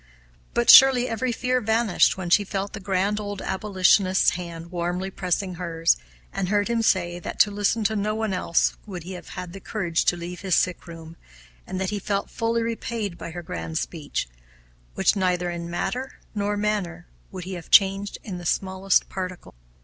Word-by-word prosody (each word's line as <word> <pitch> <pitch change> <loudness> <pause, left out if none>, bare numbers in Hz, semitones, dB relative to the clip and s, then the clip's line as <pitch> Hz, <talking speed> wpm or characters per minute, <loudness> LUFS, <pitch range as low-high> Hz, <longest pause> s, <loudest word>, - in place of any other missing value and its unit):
But 240 - +6
surely 260 -2 +8
every 245 +2 -1
fear 250 +2 0
vanished 220 -4 +2
when 180 -2 -5
she 205 - +5
felt 200 0 -4
the - - -5
grand 195 +2 0
old 205 -1 -5
abolitionist's 190 -1 +3
hand 170 -1 -7
warmly 180 +2 -2
pressing 185 0 -2
hers, 165 -1 +2 0.4
and 195 -2 -2
heard 205 +1 +1
him 235 -1 +1
say 175 -5 +1
that - - -7
to 205 - +4
listen 205 +2 0
to 220 +1 +1
no 210 +1 -1
one 220 -2 -1
else 180 -2 +1
would 180 -4 -6
he 180 - -8
have 180 - -8
had 180 +1 -7
courage 175 -6 -1
to 175 - +2
leave 175 +1 -7
his 190 -3 +1
sick 180 -1 0
room, 165 -1 -10 0.5
and 185 - -4
that 190 0 -1
he 205 - -2
felt 200 0 -2
fully 230 0 0
repaid 225 -4 -3
by 170 - -7
her 175 +1 -7
grand 80 - -5
speech, - - -3 0.7
which - - +3
neither 180 -2 0
in 170 0 -5
matter 250 +9 -3 0.2
nor 205 -1 -1
manner 200 -5 -2 0.2
would 185 -2 -7
he 190 +2 -6
have 175 -2 -8
changed 195 +1 +4
in 185 -4 -6
the 175 - -9
smallest 190 +1 +1
particular. 185 -2 -6
190 Hz, 185 wpm, -24 LUFS, 175-210 Hz, 0.7 s, surely